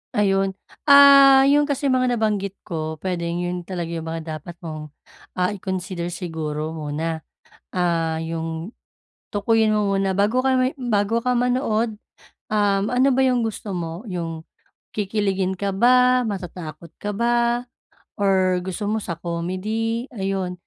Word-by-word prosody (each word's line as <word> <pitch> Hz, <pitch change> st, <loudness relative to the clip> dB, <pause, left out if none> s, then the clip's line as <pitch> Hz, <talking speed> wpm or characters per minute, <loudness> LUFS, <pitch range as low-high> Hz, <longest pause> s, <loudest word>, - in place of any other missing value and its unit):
Ayun. 195 Hz, -2 st, +2 dB, 0.3 s
Ah, 275 Hz, -1 st, +9 dB
'yon 290 Hz, +1 st, +4 dB
kasi 280 Hz, -1 st, 0 dB
mga 255 Hz, -1 st, +2 dB
nabanggit 205 Hz, -3 st, -1 dB
ko, 160 Hz, -1 st, -4 dB
puwedeng 170 Hz, 0 st, -3 dB
'yon 175 Hz, -1 st, -4 dB
talaga 175 Hz, -3 st, -4 dB
yung 165 Hz, -1 st, -4 dB
mga 160 Hz, -1 st, -5 dB
dapat 170 Hz, +3 st, -10 dB
mong, 155 Hz, -2 st, -6 dB, 0.5 s
ah, 180 Hz, +1 st, +1 dB
i-consider 185 Hz, -3 st, -4 dB
siguro 160 Hz, -3 st, -4 dB
muna. 160 Hz, +1 st, -3 dB, 0.6 s
Ah, 165 Hz, -3 st, 0 dB
'yong 165 Hz, +2 st, -4 dB, 0.6 s
tukuyin 220 Hz, +1 st, +2 dB
mo 210 Hz, -2 st, +1 dB
muna 195 Hz, -1 st, 0 dB
bago 215 Hz, +6 st, +2 dB
ka 260 Hz, 0 st, +2 dB
may 255 Hz, +2 st, +1 dB
bago 230 Hz, -3 st, 0 dB
ka 250 Hz, 0 st, +1 dB
manood, 240 Hz, -3 st, +1 dB, 0.6 s
um, 205 Hz, -1 st, +2 dB
ano 250 Hz, +3 st, +3 dB
ba 260 Hz, -, +2 dB
'yong 250 Hz, -2 st, +2 dB
gusto 215 Hz, -3 st, -4 dB
mo? 170 Hz, +5 st, -5 dB
'Yong 165 Hz, -4 st, -5 dB, 0.5 s
kikiligin 195 Hz, -2 st, -1 dB
ka 200 Hz, 0 st, -2 dB
ba, 250 Hz, +3 st, +5 dB
matatakot 175 Hz, -6 st, -6 dB
ka 205 Hz, -, -2 dB
ba 235 Hz, +2 st, +1 dB, 0.5 s
or 190 Hz, -2 st, +2 dB
gusto 190 Hz, +3 st, -4 dB
mo 215 Hz, +1 st, -1 dB
sa 170 Hz, -5 st, -5 dB
comedy? 185 Hz, +8 st, -2 dB
Ayun, 195 Hz, -3 st, -2 dB
195 Hz, 140 wpm, -22 LUFS, 170-230 Hz, 0.6 s, Ah